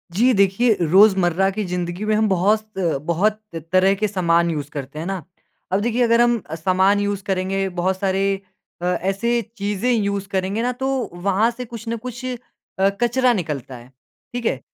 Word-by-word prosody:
जी 250 +5 +4
देखिए 200 +3 +3
रोज़मर्रा 190 +1 +4
की 210 +2 -3
ज़िंदगी 180 +2 -3
में 215 - +1
हम 220 0 +2
बहुत 205 +4 +2 0.4
बहुत 205 +6 +1 0.3
तरह 185 +1 +4
के 215 - +3
सामान 170 -4 +2
यूज़ 150 -2 -4
करते 140 +1 -6
हैं 160 - -4
ना। 190 -2 -4 0.5
अब 190 - +2
देखिए 240 +2 +1
अगर 230 0 +4
हम 240 -2 +3
सामान 190 +4 +2
यूज़ 205 -1 -2
करेंगे, 195 0 -1
बहुत 185 +1 -1
सारे 195 0 0 0.4
अ, - - -3
ऐसे 195 +6 0 0.2
चीज़ें 205 +4 -1
यूज़ 200 -4 0
करेंगे 195 +3 -1
ना 245 +1 0
तो 265 +2 -3 0.3
वहाँ 195 +5 +1
से 250 +1 -7
कुछ 230 -1 -9
ना 230 - -1
कुछ 245 +1 -8
अ, 255 -1 -3 0.6
कचरा 245 +1 +3
निकलता 145 - -4
है, 120 +2 -15 0.4
ठीक 245 -1 -4
है। 135 - 0
195 Hz, 175 wpm, -21 LUFS, 185-225 Hz, 0.6 s, जी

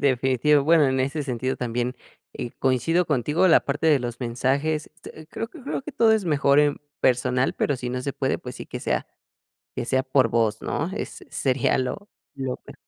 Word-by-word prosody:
definitivo. 135 +2 +3
Bueno, 160 -1 +5
en 130 0 +1
ese 145 +3 -1
sentido 130 -1 -2
también, 125 +1 -2 0.4
eh, 120 - -5
coincido 165 +7 +2
contigo 150 +6 +2
la 165 - +6
parte 145 +3 -1
de 150 -3 +5
los 120 0 -5
mensajes, 140 +6 -1
este, 160 -1 -12
creo 225 +8 -5
que 325 - -13
creo - - -3
que 305 - -8
todo 225 -3 +4
es 215 -3 +1
mejor 145 -2 +3
en 145 -1 +1 0.2
personal, 125 +1 +2
pero 145 - 0
si 125 -1 -4
no 125 0 -2
se 140 +1 -3
puede, 135 -1 -1
pues 125 - -8
sí - - -8
que - - -6
sea - - -1 0.7
que 120 - -3
sea 130 +1 +1
por 130 -2 +3
voz, 110 -1 0
¿no?, 165 - -2
es 210 - -6
sería 130 -2 +1
lo 165 +11 -3 0.3
lo 130 -2 -4
me. - - -11
135 Hz, 200 wpm, -24 LUFS, 125-155 Hz, 0.7 s, la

